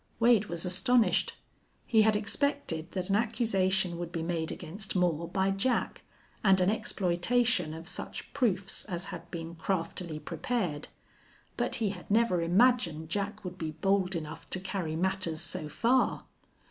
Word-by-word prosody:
Wade 230 -3 +5
was 170 -2 -3
astonished. 230 +6 +3 0.5
He 220 -2 +4
had 215 0 +4
expected 210 - -1
that 185 0 -2
an - - +4
accusation 195 -6 +1
would 175 -1 -4
be 165 -2 -3
made 165 -1 -2
against 195 +5 -6
Moore 170 -3 +1
by 190 +1 +1
Jack, 195 +6 0 0.4
and 190 -2 +5
an 185 +2 +3
exploitation 190 -1 +1
of 165 +1 -8
such - - -6
proofs 205 -8 0
as 180 -3 -3
had 170 0 -8
been 165 0 -6
craftily 170 -2 -3
prepared, 165 0 -3 0.7
but - - -1
he 220 -3 0
had 180 -3 -10
never 205 -5 +3
imagined 175 -4 +3
Jack 200 +4 -3
would 180 0 -6
be 160 - -2
bold 190 +3 +1
enough 155 -2 -6
to 190 - -2
carry 185 -4 -3
matters 185 -2 -1
so 165 -3 -2
far. 240 - +2
185 Hz, 150 wpm, -30 LUFS, 170-210 Hz, 0.7 s, Wade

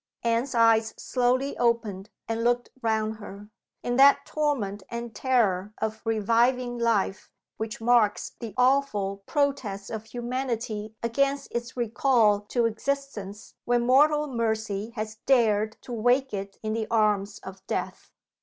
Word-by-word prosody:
Anne's 235 +3 0
eyes 225 -1 +4
slowly 255 +2 0
opened 230 -5 0 0.2
and 225 0 -2
looked 240 0 +1
round 220 -1 0
her 205 -1 -10 0.3
in 245 0 -1
that 275 +1 +6
torment 255 -10 -1
and 235 -1 -5
terror 215 -6 +1
of 220 0 -3
reviving 235 +3 +1
life 220 -5 0 0.3
which 220 0 -4
marks 230 -2 +2
the 225 -4 -7
awful 250 -7 +2
protest 260 -9 -1
of 220 -1 -5
humanity 235 -3 -4
against 275 +4 0
its 235 +1 -4
recall 230 -2 +3
to 235 +3 0
existence 225 -4 -4
when 240 0 +2
mortal 295 +4 +4
mercy 220 -5 -2
has 215 -1 -5
dared 220 -5 +3
to 245 - -7
wake 245 +3 +2
it 195 0 -5
in 215 0 -1
the 220 -1 -2
arms 210 -2 +1
of 190 0 -9
Death. - - -4
230 Hz, 135 wpm, -26 LUFS, 215-250 Hz, 0.3 s, that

